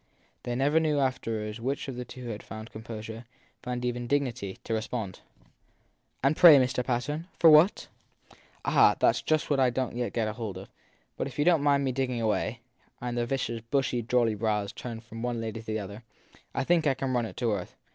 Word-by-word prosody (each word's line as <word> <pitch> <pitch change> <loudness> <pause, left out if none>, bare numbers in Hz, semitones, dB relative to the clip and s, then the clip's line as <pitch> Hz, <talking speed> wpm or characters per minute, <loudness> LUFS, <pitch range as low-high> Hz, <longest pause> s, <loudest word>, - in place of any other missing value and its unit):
They 120 - -3
never 145 +5 +3
knew 155 -2 +1
afterwards 115 -5 -2
which 135 +5 -2
of 135 - -5
the 125 0 -5
two 125 +1 -10
had 105 -2 -4
first - - -21
found 110 0 -8
composure 110 +1 -8 0.4
found 125 0 -3
even 120 0 -2
dignity 125 -8 -1
to 115 - -3
respond. 110 -3 -3 1.0
And 140 +3 +3
pray, 160 -4 +9
Mr. 125 -1 +1
Patten, 135 +7 -2
for 165 - +7
what? 155 +6 +5 0.5
7 - - -21 0.3
Ah, - - +5
that - - +5
s - - -4
just 155 -1 0
what 140 - +3
I 130 -1 +4
don 125 +1 -2
t 120 - -6
yet 120 - -2
get 115 -2 0
hold 110 -3 -5
of. - - -10 0.5
But - - -2
if 135 - -10
you 145 - +2
don 170 -2 +5
t - - -4
mind 140 -1 +3
my 130 - +1
digging 130 -2 -1
away 110 +2 -1 0.4
and 120 0 -4
the 120 -1 -1
vicar 125 -3 -2
s - - -8
bushy, 130 -3 +1
jolly 120 -1 +2
brows 105 -1 -1
turned 115 -2 -7
from 115 0 -9
one 120 0 -1
of 115 - -3
the - - -4
ladies 110 0 -6
to 110 - -4
the 110 - 0
other 100 +2 -7 0.5
I - - +1
think 165 +1 +2
I 135 - +3
can 130 0 -2
run 120 -2 +1
it - - -12
to 120 -3 0
earth. 95 -3 -5
120 Hz, 230 wpm, -28 LUFS, 115-135 Hz, 1.0 s, pray